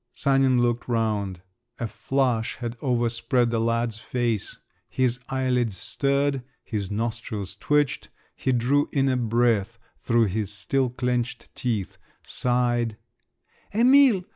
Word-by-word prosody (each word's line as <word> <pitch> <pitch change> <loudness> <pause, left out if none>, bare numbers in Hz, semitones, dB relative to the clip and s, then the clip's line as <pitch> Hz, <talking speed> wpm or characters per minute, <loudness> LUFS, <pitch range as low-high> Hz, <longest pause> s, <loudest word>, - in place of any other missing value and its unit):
Sanin 135 -2 +3
looked 120 0 0
round… 105 -6 -1 0.4
A 120 - -1
flush 125 0 0
had 120 -1 -5
over 120 -3 +1
spread 115 +1 +1
the 115 - +1
lad's 115 -1 0
face; 120 -3 -2 0.3
his 125 -2 0
eyelids 125 -6 0
stirred… 140 +4 0 0.2
his 100 -4 -3
nostrils 110 -2 -3
twitched. 145 +6 0 0.3
He 130 - -1
drew 130 +4 +2
in 135 -1 +2
a 130 - +2
breath 115 -2 +1 0.2
through 115 -1 +2
his 105 0 -2
still 125 +6 0
clenched 125 0 -2
teeth, 110 -7 -3 0.2
sighed…. 120 -2 0 0.8
"Emil!" 250 -4 +6
120 Hz, 120 wpm, -25 LUFS, 115-130 Hz, 0.8 s, Emil